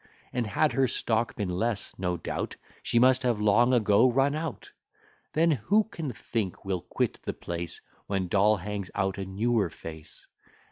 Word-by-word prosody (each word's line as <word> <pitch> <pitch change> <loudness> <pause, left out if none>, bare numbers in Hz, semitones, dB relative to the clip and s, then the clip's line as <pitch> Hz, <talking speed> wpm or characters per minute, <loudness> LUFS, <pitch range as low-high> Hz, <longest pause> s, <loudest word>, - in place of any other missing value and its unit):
And 120 -3 -1
had 150 +8 +2
her 135 -1 +3
stock 115 -1 0
been 105 - -2
less, 105 +4 -1
no 90 -2 -1
doubt 85 - -4 0.3
She - - 0
must 130 +2 +5
have 120 -4 +1
long 105 +4 +4
ago 115 0 +4
run 135 +3 +2
out. 155 -2 -5 0.6
Then, 165 +2 +4
who 190 - +3
can 165 - -5
think 110 -4 -4
we'll 95 -2 -1
quit 90 - -2
the - - -3
place, 85 -1 -4 0.3
When 95 -2 -1
Doll 105 +3 +4
hangs 100 0 -5
out 95 0 0
a 95 - -3
newer 105 +1 +1
face? 80 -1 -10
110 Hz, 170 wpm, -28 LUFS, 95-125 Hz, 0.6 s, must